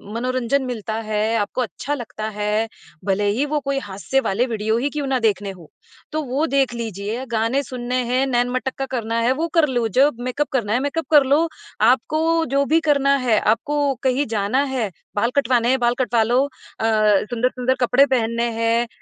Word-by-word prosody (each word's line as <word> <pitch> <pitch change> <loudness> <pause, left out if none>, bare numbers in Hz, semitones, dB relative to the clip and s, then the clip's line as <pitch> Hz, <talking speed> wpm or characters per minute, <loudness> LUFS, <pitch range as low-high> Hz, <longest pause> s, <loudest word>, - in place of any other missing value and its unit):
मनोरंजन 255 +2 0
मिलता 225 -4 -4 0.2
है, 215 +1 0
आपको 210 +4 -1
अच्छा 245 - -4
लगता 220 -4 -6
है, 210 +2 0 0.4
भले 205 +1 +1
ही 240 +8 +1
वो 300 +1 -1
कोई 275 -1 -2
हास्य 205 +4 -2
वाले 230 +1 0
वीडियो 220 -1 -1
ही 270 +5 0
क्यों 290 -1 -3
ना 265 -1 +1
देखने 205 -3 0
हों। 175 -4 -13 0.5
तो 310 - 0
वो 275 +4 -1
देख 270 -3 +1
लीजिए, 225 +2 -4
गाने 230 +5 +1
सुनने 250 -1 -3
हैं, 255 +3 +1
नैन-मटक्का 255 +2 -1
करना 230 0 -2
है 235 +2 +2
वो 320 +5 -2
कर 325 -2 +5
लो, 240 -3 0
जब 265 +4 +3
मेकअप 255 +4 -1
करना 220 -5 0
है, 245 - +2
मेकअप 285 +4 -2
कर 295 -2 +7
लो। 295 +5 +3 0.3
आपको 315 +8 +2
जो 280 0 +3
भी 320 +3 +3
करना 280 -1 +4
है 220 -3 +4
आपको 280 +6 +1
कहीं 265 +2 +1
जाना 210 +7 +1
है 220 -6 -1 0.2
बाल 230 +3 +2
कटवाने 245 -3 +2
हैं 260 +1 +2
बाल 240 0 +2
कटवा 245 -2 +2
लो 245 +4 +2
अ, 270 -5 -8 0.4
सुंदर-सुंदर 250 +1 0
कपड़े 250 +3 +5
पहनने 235 -3 0
हैं, 230 +1 +1
245 Hz, 185 wpm, -21 LUFS, 225-275 Hz, 0.5 s, कर